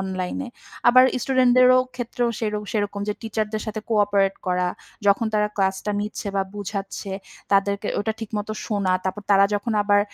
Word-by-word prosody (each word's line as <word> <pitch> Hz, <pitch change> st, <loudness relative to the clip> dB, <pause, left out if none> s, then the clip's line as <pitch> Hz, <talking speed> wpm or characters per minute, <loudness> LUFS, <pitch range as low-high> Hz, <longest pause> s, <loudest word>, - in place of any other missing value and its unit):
অনলাইনে। 190 Hz, +7 st, -3 dB, 0.4 s
আবার 255 Hz, +1 st, +8 dB, 0.2 s
স্টুডেন্টদেরও 255 Hz, -1 st, +5 dB, 0.2 s
ক্ষেত্রেও 245 Hz, 0 st, -2 dB
সের 215 Hz, -2 st, -1 dB, 0.2 s
সেরকম 205 Hz, -1 st, -1 dB
যে 210 Hz, -, 0 dB
টিচারদের 215 Hz, -1 st, -2 dB
সাথে 215 Hz, 0 st, -4 dB
কো-অপারেট 200 Hz, -2 st, +2 dB
করা। 180 Hz, 0 st, +1 dB, 0.4 s
যখন 200 Hz, +3 st, +4 dB
তারা 210 Hz, 0 st, +2 dB
ক্লাসটা 190 Hz, +1 st, 0 dB
নিচ্ছে 210 Hz, +1 st, -5 dB
বা 195 Hz, -, +2 dB
বুঝাচ্ছে 200 Hz, -1 st, -5 dB, 0.4 s
তাদেরকে 200 Hz, +1 st, +2 dB
ওটা 220 Hz, +2 st, -1 dB
ঠিকমত 210 Hz, -1 st, -4 dB, 0.2 s
শোনা। 200 Hz, -4 st, 0 dB
তারপর 190 Hz, +2 st, -3 dB
তারা 195 Hz, 0 st, +6 dB
যখন 210 Hz, +3 st, -1 dB
আবার 205 Hz, 0 st, +4 dB
205 Hz, 150 wpm, -23 LUFS, 195-220 Hz, 0.4 s, আবার